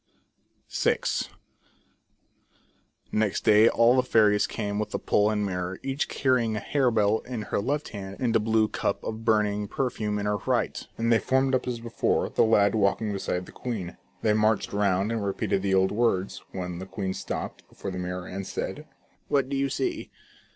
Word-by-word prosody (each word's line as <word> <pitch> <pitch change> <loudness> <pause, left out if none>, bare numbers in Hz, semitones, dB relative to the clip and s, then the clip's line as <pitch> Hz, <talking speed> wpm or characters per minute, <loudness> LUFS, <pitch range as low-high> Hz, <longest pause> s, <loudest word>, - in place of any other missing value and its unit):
VI. - - +2 2.1
Next 105 -2 0
day 110 +2 +6
all 115 +2 +4
the 130 - +5
fairies 105 -4 +3
came 105 -2 -3
with 105 0 -2
the - - -2
pole 105 +1 +2
and 105 -1 0
mirror, 90 -1 -3
each 135 +1 -2
carrying 125 -5 +1
a - - -1
harebell 110 -5 +2
in 120 -4 -5
her - - -2
left 145 +8 -1
hand, 100 -2 -7
and 120 -3 +1
a - - +6
blue 110 0 +2
cup - - -2
of 110 0 -5
burning 105 -2 +1
perfume 110 -4 -2
in 100 - -2
her 105 0 +1
right, - - -1
and 115 +1 +2
they 115 - +4
formed 130 0 +1
up 130 - +1
as 120 -2 -2
before, 115 0 0
the - - +2
lad 105 -3 +4
walking 105 0 +1
beside 90 -2 -2
the - - -13
queen. 105 -8 -5 0.3
They 110 - +3
marched 110 -1 +1
round 100 0 +1
and 115 -2 -1
repeated 100 -1 -1
the 95 0 +1
old 95 0 +3
words,, 105 -4 0
when 90 -2 -5
the 95 - -7
queen 95 0 -3
stopped - - -6
before 100 - -6
the 90 - -5
mirror, 90 0 -4
and 95 +1 -6
said: - - -5 0.2
" - - -39
What 135 -2 +1
do 140 - -2
you 135 0 +1
see 135 0 -2
105 Hz, 185 wpm, -27 LUFS, 100-115 Hz, 2.1 s, day